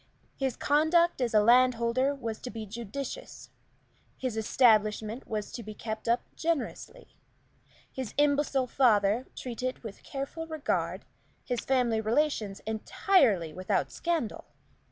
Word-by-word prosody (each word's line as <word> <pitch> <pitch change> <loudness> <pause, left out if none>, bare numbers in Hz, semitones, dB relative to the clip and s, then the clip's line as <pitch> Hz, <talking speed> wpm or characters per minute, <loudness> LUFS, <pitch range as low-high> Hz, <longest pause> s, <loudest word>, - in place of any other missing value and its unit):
His 265 -3 -1
conduct 315 +2 +3
as 235 -3 0
a - - +8
landholder 250 +3 +4
was 230 -5 -5
to 250 - -7
be 225 -2 -6
judicious, 235 +5 -7 0.7
his 255 -4 -3
establishment 220 0 +2
was 210 -2 -4
to 240 - -6
be 215 -1 -9
kept 220 0 -5
up 235 +1 +3
generously, 335 - -3 0.8
his 260 -5 -6
imbecile 285 -2 +2
father 230 -2 +3
treated 250 +1 -4
with 220 -3 -8
careful 280 +4 -5
regard, 315 -3 -2 0.4
his 245 -2 -2
family 245 -4 +1
relations 220 -4 0
entirely 220 - +2
without 185 +2 -1
scandal. 330 -10 -2
245 Hz, 120 wpm, -29 LUFS, 220-275 Hz, 0.8 s, a